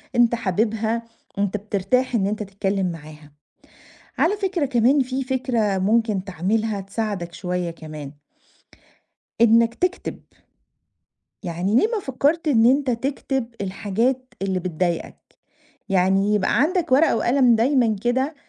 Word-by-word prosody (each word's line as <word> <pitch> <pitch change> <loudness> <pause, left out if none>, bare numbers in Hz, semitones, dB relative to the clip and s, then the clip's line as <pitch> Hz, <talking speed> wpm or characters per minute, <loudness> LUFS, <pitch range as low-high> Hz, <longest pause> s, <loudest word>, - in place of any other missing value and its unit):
أنت 240 -1 +4
حاببها، 225 +2 -1 0.3
أنت 200 0 0
بترتاح 210 +5 0
إن 195 -4 +1
أنت 210 +1 -2
تتكلّم 195 -1 -2
معاها. 150 -2 -12 0.9
على 400 +6 +2
فكرة 380 -6 -1
كمان 255 +2 +3
في 260 +1 -2
فكرة 245 -6 0
ممكن 210 0 +1
تعملها 200 +3 -1
تساعدك 195 -3 -4
شوية 180 -1 -3
كمان. 155 -4 -9 1.3
إنك 230 0 +5
تكتب. 360 +5 -2 1.2
يعني 180 +2 -2
ليه 250 - +5
ما 455 -2 -2
فكّرت 295 +2 0
إن 230 -5 +4
أنت 265 +1 +3
تكتب 265 +1 -2
الحاجات 230 +6 -2
اللي 190 -1 0
بتضايقك؟ 175 -1 -2 0.7
يعني 195 +2 +2
يبقى 210 +2 +1
عَندك 335 +1 +1
ورقة 280 -1 +4
وقلم 245 0 +3
دايمًا 235 -2 +2
كده، 260 +5 0
225 Hz, 120 wpm, -22 LUFS, 195-255 Hz, 1.3 s, إنك